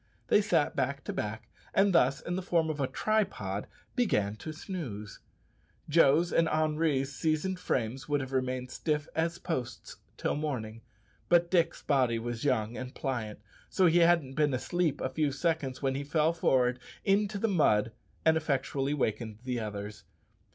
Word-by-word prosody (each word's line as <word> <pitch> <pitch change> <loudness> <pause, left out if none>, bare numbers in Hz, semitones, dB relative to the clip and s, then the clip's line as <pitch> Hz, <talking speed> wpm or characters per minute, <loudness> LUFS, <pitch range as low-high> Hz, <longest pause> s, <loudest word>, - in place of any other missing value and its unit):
They 210 - +5
sat 165 -7 +1
back 140 +1 -1
to - - -4
back, 105 +1 -4 0.3
and 195 0 +4
thus, 140 -4 +3
in 175 - -3
the 185 - -2
form 165 -3 +1
of 150 - -6
a 135 - +1
tripod, 180 - -1 0.3
began 105 - +1
to 155 - -6
snooze. 150 - -6 0.7
Joe's 165 +2 +4
and 165 -1 +3
Henri's 155 -3 +1
seasoned 165 +4 0
frames 130 -2 -2
would 145 0 +2
have 135 -1 -5
remained 130 -1 -2
stiff 150 -2 -1
as 165 +1 0
posts 145 -9 -5 0.2
till - - -1
morning; 120 -7 -4 0.5
but 175 0 +4
Dick's 170 -3 +2
body 130 -5 +2
was 120 0 -4
young 120 -5 +1
and 130 0 -7
pliant, 110 -6 -3 0.3
so 190 - +3
he 170 0 +5
hadn't 170 -6 +3
been 145 -2 +2
asleep 165 +2 0
a 130 - -1
few 145 +2 0
seconds 145 -3 -1
when 135 -1 +1
he 140 +2 -3
fell 155 +3 +2
forward 125 -6 +2 0.3
into 205 +1 +2
the 225 - +1
mud 115 - +3 0.3
and 160 0 +5
effectually 140 -2 -1
awakened 110 -5 -2
the 125 -2 -2
others. 105 -1 -6
145 Hz, 165 wpm, -30 LUFS, 125-165 Hz, 0.7 s, They